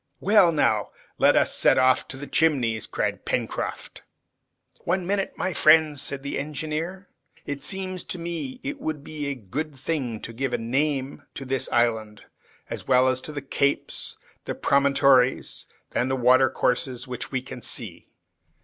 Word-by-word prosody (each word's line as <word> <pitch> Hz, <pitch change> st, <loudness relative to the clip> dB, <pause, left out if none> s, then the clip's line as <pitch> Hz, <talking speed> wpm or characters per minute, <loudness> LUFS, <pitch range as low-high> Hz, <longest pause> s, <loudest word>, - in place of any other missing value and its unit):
"Well, 200 Hz, -3 st, +5 dB
now 110 Hz, -, +1 dB, 0.3 s
let -, -, +5 dB
us -, -, +3 dB
set -, -, +4 dB
off 130 Hz, 0 st, +3 dB
to 130 Hz, -, -5 dB
the 145 Hz, -, -7 dB
Chimneys!" 130 Hz, -10 st, +1 dB
cried -, -, -2 dB
Pencroft. -, -, -3 dB, 0.8 s
"One 180 Hz, +1 st, -1 dB
minute, 195 Hz, +1 st, -1 dB
my 185 Hz, -, -1 dB
friends," 155 Hz, -3 st, +5 dB
said 140 Hz, -1 st, -5 dB
the 140 Hz, -, -3 dB
engineer. 155 Hz, +6 st, -4 dB, 0.4 s
"It 145 Hz, -1 st, -4 dB
seems 185 Hz, +3 st, -2 dB
to -, -, -5 dB
me 170 Hz, +10 st, -5 dB
it 280 Hz, 0 st, -5 dB
would 155 Hz, -2 st, -3 dB
be 150 Hz, -2 st, -5 dB
a 140 Hz, -, -2 dB
good 140 Hz, +7 st, -5 dB
thing 130 Hz, -5 st, -3 dB
to 115 Hz, -, -7 dB
give 130 Hz, +2 st, -2 dB
a -, -, +2 dB
name 135 Hz, +3 st, -1 dB
to 135 Hz, -, -6 dB
this 130 Hz, 0 st, -2 dB
island, 110 Hz, -3 st, 0 dB, 0.4 s
as -, -, -6 dB
well 130 Hz, +1 st, +5 dB
as 130 Hz, 0 st, -1 dB
to, 155 Hz, -, -4 dB
the 145 Hz, -2 st, -5 dB
capes, 140 Hz, +1 st, -1 dB, 0.3 s
promontories, 140 Hz, -2 st, +2 dB, 0.2 s
and 130 Hz, +2 st, 0 dB
watercourses, 125 Hz, 0 st, +2 dB
which 125 Hz, -1 st, -5 dB
we 130 Hz, -2 st, -2 dB
can 130 Hz, -1 st, -9 dB
see. -, -, -4 dB
140 Hz, 155 wpm, -25 LUFS, 130-160 Hz, 0.8 s, Well